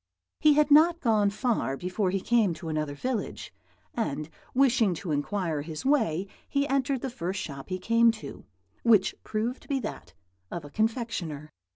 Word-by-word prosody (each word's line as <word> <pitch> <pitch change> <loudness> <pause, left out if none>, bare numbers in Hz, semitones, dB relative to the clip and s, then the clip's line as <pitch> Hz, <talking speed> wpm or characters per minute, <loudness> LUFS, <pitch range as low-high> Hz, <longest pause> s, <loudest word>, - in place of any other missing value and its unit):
"He 305 -1 +6
had 300 0 +3
not 330 +3 +6
gone 215 -7 +3
far 210 - -1
before 185 +3 -1
he 190 +1 -1
came 220 -7 +2
to 160 +1 -7
another 155 -2 -2
village, 250 - -4 0.4
and 155 -9 -3 0.2
wishing 245 -8 +4
to 180 -1 -5
inquire 160 +1 -1
his 155 - -7
way 220 - +2 0.2
he 280 0 +1
entered 270 -1 0
the 265 - -2
first 190 -5 -3
shop 140 -3 -7
he 185 - -2
came 230 +5 +4
to, 215 - -9 0.4
which 220 -5 +4
proved 225 +4 -2
to - - -18
be 275 -2 0
that 215 - -7 0.3
of 170 -4 -6
a 145 - -11
confectioner. 215 - -2
210 Hz, 170 wpm, -28 LUFS, 165-250 Hz, 0.4 s, He